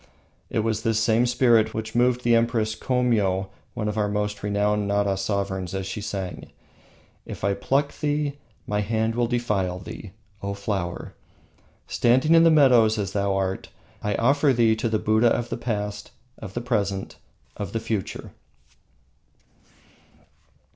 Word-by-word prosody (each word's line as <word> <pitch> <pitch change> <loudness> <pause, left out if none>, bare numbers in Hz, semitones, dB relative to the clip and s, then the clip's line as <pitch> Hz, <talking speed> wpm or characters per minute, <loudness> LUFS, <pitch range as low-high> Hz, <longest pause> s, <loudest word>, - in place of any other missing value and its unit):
It 110 - 0
was 110 -1 -1
the 115 -1 0
same 115 +2 +3
spirit 115 -3 +3
which 110 0 -4
moved 125 +1 +2
the 120 -1 +4
Empress 115 -1 +1
Komio, 110 -7 0 0.3
one 110 -3 -2
of 105 +1 -2
our 105 - +1
most 105 0 -2
renowned 105 0 0
Nara 100 -1 +1
sovereigns, 95 -1 -2
as 95 -1 -3
she 100 +2 -5
sang: 100 -3 -5 0.7
"If - - -9
I 100 0 +2
pluck 140 +7 0
thee, 145 -1 -1 0.3
my 105 0 -1
hand 110 +1 0
will 120 0 +1
defile 105 -7 -1
thee, 95 +1 -9 0.3
O 100 0 -3
flower! 100 -3 -4 0.7
Standing 130 +7 +3
in 165 0 +7
the 165 - +7
meadows 125 -8 +5
as 100 -2 -2
thou 100 -1 0
art, 95 0 -2 0.3
I 105 -1 -1
offer 140 +3 +3
thee 115 -2 +3
to 115 +1 -1
the 110 - +1
Buddhas 110 +2 +3
of 120 0 -2
the - - -3
past, 105 -3 -4 0.3
of 100 -3 -9
the 120 - -2
present, 100 -5 -2 0.4
of 100 -3 -5
the 115 - -2
future." 110 -3 -4
110 Hz, 155 wpm, -24 LUFS, 100-120 Hz, 0.7 s, in